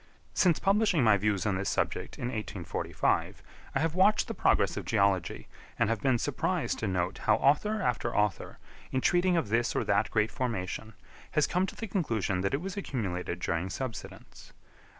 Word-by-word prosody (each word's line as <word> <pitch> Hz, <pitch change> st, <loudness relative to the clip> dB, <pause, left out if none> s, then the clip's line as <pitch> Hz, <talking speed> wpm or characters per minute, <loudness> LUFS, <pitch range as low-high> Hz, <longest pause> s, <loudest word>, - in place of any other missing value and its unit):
Since 175 Hz, -5 st, +3 dB
publishing 195 Hz, -, +2 dB
my 110 Hz, -3 st, +6 dB
views 100 Hz, 0 st, 0 dB
on 100 Hz, -3 st, +1 dB
this 100 Hz, -, -1 dB
subject -, -, -2 dB
in 120 Hz, -, -3 dB
1845, 105 Hz, -8 st, -2 dB, 0.3 s
I -, -, +3 dB
have 165 Hz, 0 st, 0 dB
watched 190 Hz, +4 st, +4 dB
the -, -, -3 dB
progress -, -, +2 dB
of -, -, -4 dB
geology, 100 Hz, -6 st, 0 dB, 0.3 s
and 110 Hz, -, +2 dB
have 115 Hz, -, -1 dB
been 130 Hz, -3 st, +3 dB
surprised -, -, -1 dB
to -, -, -2 dB
note 90 Hz, -2 st, -1 dB
how -, -, +5 dB
author 210 Hz, +10 st, +2 dB
after 120 Hz, -1 st, -1 dB
author, 105 Hz, -3 st, 0 dB, 0.3 s
in 130 Hz, -, +1 dB
treating 180 Hz, +3 st, +3 dB
of 160 Hz, -, -1 dB
this 115 Hz, +2 st, +1 dB
or -, -, +1 dB
that -, -, +1 dB
great 105 Hz, +2 st, +1 dB
formation, 110 Hz, -4 st, -3 dB, 0.4 s
has 150 Hz, -, +3 dB
come 180 Hz, +2 st, 0 dB
to -, -, -8 dB
the 225 Hz, -, -5 dB
conclusion 115 Hz, -, -1 dB
that 100 Hz, +6 st, 0 dB
it 140 Hz, -, -3 dB
was 195 Hz, +1 st, -5 dB
accumulated 95 Hz, -, -3 dB
during 85 Hz, +2 st, -1 dB
subsidence. 115 Hz, +3 st, -7 dB
115 Hz, 180 wpm, -29 LUFS, 100-165 Hz, 0.4 s, my